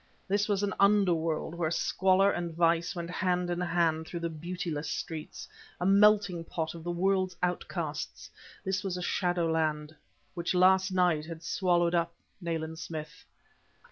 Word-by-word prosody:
This 205 Hz, +1 st, +1 dB
was 205 Hz, -1 st, +1 dB
an 200 Hz, -2 st, 0 dB
underworld 175 Hz, -6 st, +2 dB
where 170 Hz, -2 st, -1 dB
squalor 190 Hz, +3 st, +3 dB
and 175 Hz, -1 st, -3 dB
vice 170 Hz, +1 st, +2 dB
went 170 Hz, 0 st, -5 dB
hand 180 Hz, -1 st, 0 dB
in 175 Hz, -, -1 dB
hand 165 Hz, -2 st, +1 dB
through 170 Hz, -, -5 dB
the 170 Hz, 0 st, -2 dB
beautiless 165 Hz, -1 st, -4 dB
streets, 160 Hz, -2 st, -5 dB, 0.3 s
a 180 Hz, -, -1 dB
melting 200 Hz, -3 st, +4 dB
pot 160 Hz, -1 st, -3 dB
of 165 Hz, -1 st, -9 dB
the 175 Hz, -, -4 dB
world's 185 Hz, +1 st, +1 dB
outcasts; 180 Hz, 0 st, -3 dB, 0.4 s
this 190 Hz, +1 st, -1 dB
was 190 Hz, -2 st, -2 dB
the 180 Hz, -, -4 dB
shadowland, 160 Hz, -4 st, 0 dB, 0.4 s
which 175 Hz, +1 st, -2 dB
last 190 Hz, +1 st, +4 dB
night 175 Hz, -4 st, +2 dB
had 165 Hz, -1 st, -8 dB
swallowed 175 Hz, -1 st, +1 dB
up 170 Hz, -1 st, 0 dB, 0.3 s
Nayland 160 Hz, -1 st, -3 dB
Smith. 155 Hz, +2 st, -7 dB
175 Hz, 150 wpm, -30 LUFS, 165-185 Hz, 0.4 s, melting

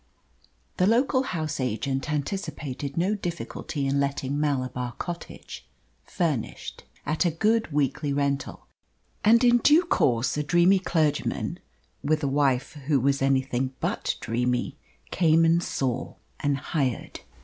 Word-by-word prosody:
The 185 Hz, -, +3 dB
local 255 Hz, +4 st, +3 dB
house 155 Hz, -, -3 dB
agent 135 Hz, +4 st, -2 dB
anticipated 145 Hz, -3 st, -4 dB
no 185 Hz, +5 st, +2 dB
difficulty 170 Hz, -6 st, -4 dB
in 135 Hz, +1 st, +1 dB
letting 140 Hz, 0 st, -1 dB
Malabar 130 Hz, -4 st, -1 dB
Cottage, 175 Hz, +6 st, -7 dB, 0.4 s
furnished, 155 Hz, -, -3 dB, 0.2 s
at 155 Hz, +4 st, +1 dB
a 175 Hz, -, +3 dB
good 215 Hz, +4 st, +1 dB
weekly 145 Hz, 0 st, 0 dB
rental; 140 Hz, 0 st, -2 dB, 0.6 s
and 230 Hz, +3 st, +5 dB
in 240 Hz, 0 st, +5 dB
due 300 Hz, +7 st, +5 dB
course 125 Hz, -, +1 dB
a -, -, +1 dB
dreamy 175 Hz, +5 st, +4 dB
clergyman, 160 Hz, -5 st, -1 dB, 0.4 s
with 155 Hz, +1 st, +1 dB
a -, -, +2 dB
wife 135 Hz, -2 st, +1 dB, 0.2 s
who 145 Hz, -3 st, +3 dB
was 140 Hz, +2 st, +1 dB
anything 130 Hz, -1 st, 0 dB
but -, -, -1 dB
dreamy, 125 Hz, +4 st, -1 dB, 0.4 s
came 165 Hz, -2 st, +4 dB
and 165 Hz, +1 st, +4 dB
saw 130 Hz, -6 st, -2 dB, 0.2 s
and 145 Hz, -1 st, +1 dB
hired. 135 Hz, -3 st, -2 dB
145 Hz, 125 wpm, -26 LUFS, 135-170 Hz, 0.6 s, and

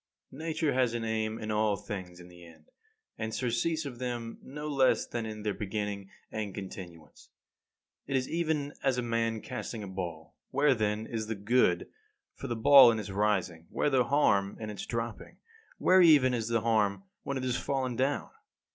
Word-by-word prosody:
20. 150 Hz, +4 st, -9 dB
Nature 160 Hz, -2 st, 0 dB
has 125 Hz, -2 st, +2 dB
an 115 Hz, -, -2 dB
aim 110 Hz, 0 st, -1 dB
in 110 Hz, -1 st, -4 dB
all 105 Hz, -1 st, +2 dB
things, 90 Hz, -4 st, -7 dB
in 90 Hz, -, -12 dB
the 90 Hz, 0 st, -15 dB
end 80 Hz, -2 st, -17 dB, 0.5 s
and 110 Hz, -1 st, -3 dB
surcease 140 Hz, +6 st, 0 dB
of 125 Hz, -4 st, -7 dB
them 120 Hz, -2 st, -4 dB
no 150 Hz, +3 st, -7 dB
less 135 Hz, -3 st, +3 dB
than 115 Hz, -2 st, -4 dB
in 110 Hz, -1 st, -7 dB
their 105 Hz, -1 st, 0 dB
beginning 100 Hz, -1 st, -4 dB, 0.2 s
and 105 Hz, -3 st, -4 dB
continuance. 90 Hz, -4 st, -9 dB, 0.8 s
It 135 Hz, -, -1 dB
is 130 Hz, -1 st, +1 dB
even 155 Hz, -4 st, -1 dB
as 135 Hz, -2 st, +2 dB
a 125 Hz, -, 0 dB
man 115 Hz, -1 st, -1 dB
casting 110 Hz, -3 st, -5 dB
a -, -, -6 dB
ball. 85 Hz, -4 st, -6 dB, 0.2 s
Where, 140 Hz, +1 st, +3 dB
then, 110 Hz, -1 st, -1 dB
is 110 Hz, -2 st, -4 dB
the 110 Hz, -, -2 dB
good 100 Hz, -3 st, +2 dB, 0.5 s
for 135 Hz, -, -7 dB
the 120 Hz, -, -2 dB
ball 135 Hz, +2 st, +8 dB
in 110 Hz, -, -1 dB
its 105 Hz, -2 st, -5 dB
rising; 95 Hz, -5 st, 0 dB
where 145 Hz, -, 0 dB
the 130 Hz, -2 st, +3 dB
harm 100 Hz, -8 st, +2 dB
in 110 Hz, -1 st, -5 dB
dropping; 115 Hz, +3 st, -5 dB, 0.4 s
where 185 Hz, 0 st, +5 dB
even 145 Hz, -7 st, +6 dB
is 115 Hz, -2 st, -1 dB
the 115 Hz, -1 st, +1 dB
harm 110 Hz, -, +1 dB, 0.2 s
when 140 Hz, -, -3 dB
it 130 Hz, -, -4 dB
has 125 Hz, -1 st, 0 dB
fallen 130 Hz, -1 st, -2 dB
down? 135 Hz, +4 st, -1 dB
115 Hz, 185 wpm, -30 LUFS, 105-130 Hz, 0.8 s, ball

